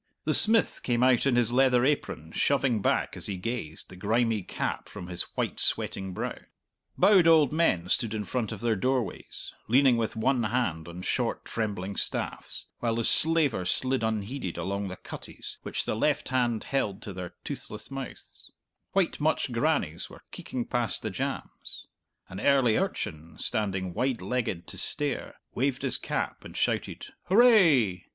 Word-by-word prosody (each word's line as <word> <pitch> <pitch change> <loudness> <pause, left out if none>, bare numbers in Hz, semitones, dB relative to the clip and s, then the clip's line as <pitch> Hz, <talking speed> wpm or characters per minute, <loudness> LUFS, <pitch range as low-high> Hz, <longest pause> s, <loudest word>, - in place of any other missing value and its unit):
The - - +2
smith 225 +1 +3
came 120 -1 +1
out 130 +1 +4
in 130 - +3
his 120 -1 +2
leather 125 -1 +4
apron, 105 - -1
shoving 135 -6 +1
back, - - 0
as - - -3
he 100 - -3
gazed, 90 -6 -3
the 95 - -11
grimy 110 +3 +1
cap 90 - -4
from - - -8
his 90 0 -2 0.2
white - - -1
sweating 95 -1 +2
brow; 90 - -4 0.6
bowed 190 -5 +6
old 155 -4 +5
men 90 - +2
stood 110 +3 +1
in 105 -1 -3
front 120 -1 -2
of 110 - -6
their 115 -2 +1
doorways, 125 -1 -2
leaning 130 +1 +5
with 115 -2 -2
one 125 +3 +1
hand 105 -9 -1
on 85 +1 -8
short, - - -1
trembling 100 -3 -3
staffs, - - -3
while 115 -1 0
the 115 - 0
slaver 150 - +4
slid 130 +8 0
unheeded 110 -2 -3
along 100 +3 -2
the 95 - -6
cutties - - -8
which - - -3
the - - -1
left 150 +6 0
hand 120 -4 +1
held 105 -8 -2
to 100 - -6
their 90 -1 -7
toothless - - -7
mouths; 135 -2 -8 0.4
white 195 -3 +1
mutched 155 -3 +1
grannies 115 - 0
were - - -14
keeking 125 -2 -5
past 120 -4 -1
the - - -2
jambs; - - -5 0.4
an 95 - -8
early 135 -5 +4
urchin, 80 -5 -3
standing 95 -5 -2
wide 125 +4 0
legged 100 -3 -2
to - - -8
stare, 145 -3 -3 0.2
waved 135 +1 -1
his 130 -2 +5
cap - - -3
and - - -9
shouted, - - -2
"Hooray!" 175 - +5
120 Hz, 165 wpm, -28 LUFS, 95-135 Hz, 0.6 s, bowed